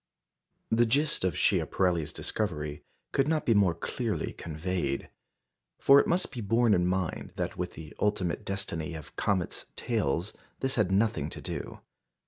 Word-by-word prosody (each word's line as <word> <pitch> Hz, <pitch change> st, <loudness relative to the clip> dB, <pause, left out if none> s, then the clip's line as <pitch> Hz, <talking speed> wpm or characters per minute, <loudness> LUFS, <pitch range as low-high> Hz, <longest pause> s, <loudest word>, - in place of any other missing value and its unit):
" -, -, -59 dB, 0.3 s
The 115 Hz, +1 st, +4 dB
gist 140 Hz, +2 st, +2 dB
of 95 Hz, -, 0 dB
Schiaparelli's 85 Hz, -5 st, +2 dB
discovery 75 Hz, 0 st, -2 dB, 0.3 s
could 135 Hz, 0 st, +2 dB
not 155 Hz, -1 st, +1 dB
be 115 Hz, -, +4 dB
more 100 Hz, -5 st, +4 dB
clearly 85 Hz, -, -2 dB
conveyed. 80 Hz, -3 st, -3 dB, 0.7 s
For 140 Hz, +1 st, +7 dB
it -, -, +2 dB
must 175 Hz, +2 st, +1 dB
be 125 Hz, -, -5 dB
borne 115 Hz, +2 st, +3 dB
in 90 Hz, -2 st, +3 dB
mind 90 Hz, -1 st, -2 dB
that -, -, -2 dB
with -, -, -3 dB
the 75 Hz, -1 st, -10 dB
ultimate 100 Hz, -4 st, 0 dB
destiny 85 Hz, -5 st, -3 dB
of 80 Hz, -3 st, -9 dB
comets' 95 Hz, -4 st, 0 dB
tails 95 Hz, -, -1 dB, 0.3 s
this 135 Hz, 0 st, 0 dB
had 105 Hz, -5 st, +2 dB
nothing 95 Hz, -7 st, +2 dB
to -, -, -7 dB
do. -, -, -5 dB
95 Hz, 155 wpm, -29 LUFS, 85-115 Hz, 0.7 s, For